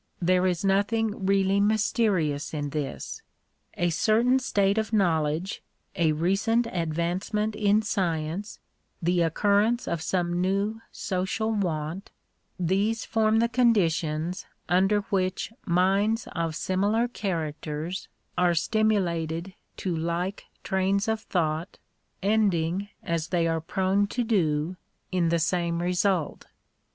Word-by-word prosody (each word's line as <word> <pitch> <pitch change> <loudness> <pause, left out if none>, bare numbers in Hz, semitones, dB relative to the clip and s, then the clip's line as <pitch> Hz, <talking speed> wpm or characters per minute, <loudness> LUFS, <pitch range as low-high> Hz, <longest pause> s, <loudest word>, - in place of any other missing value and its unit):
There 185 +1 +3
is 180 +1 -1
nothing 205 +1 +1
really 195 0 +3
mysterious 200 -8 +1
in 145 -1 -3
this. 145 -2 -4 0.5
A 175 0 +1
certain 235 +9 +3
state 200 -4 +1
of 220 0 -3
knowledge, 170 -3 +1 0.3
a 165 -4 +3
recent 195 +9 +1
advancement 180 +4 -1
in 210 +1 +3
science, 175 -1 -2 0.4
the 175 +1 +1
occurrence 205 +8 +2
of 170 - -2
some 175 0 0
new 200 +4 0
social 190 +4 -2
want, 175 -3 -2 0.3
— - - -45
these 220 +4 0
form 220 0 +2
the 230 +1 +3
conditions 180 -8 +1 0.2
under 195 +4 +3
which 185 +2 -1
minds 195 +5 +2
of 165 -2 -2
similar 205 +7 +1
characters 165 -5 -4 0.3
are 175 -1 +3
stimulated 175 -4 0 0.2
to 180 -3 -2
like 170 +4 -2 0.2
trains 195 +2 +1
of 220 0 0
thought, 165 -1 -2 0.5
ending 195 -3 +1
as 165 -2 -1
they 175 -2 +1
are 165 -1 0
prone 190 +4 +1
to 245 +4 -1
do 175 -6 0 0.3
in 175 -3 +2
the 170 - +2
same 170 0 0
result. 180 -1 0
185 Hz, 120 wpm, -26 LUFS, 170-210 Hz, 0.5 s, There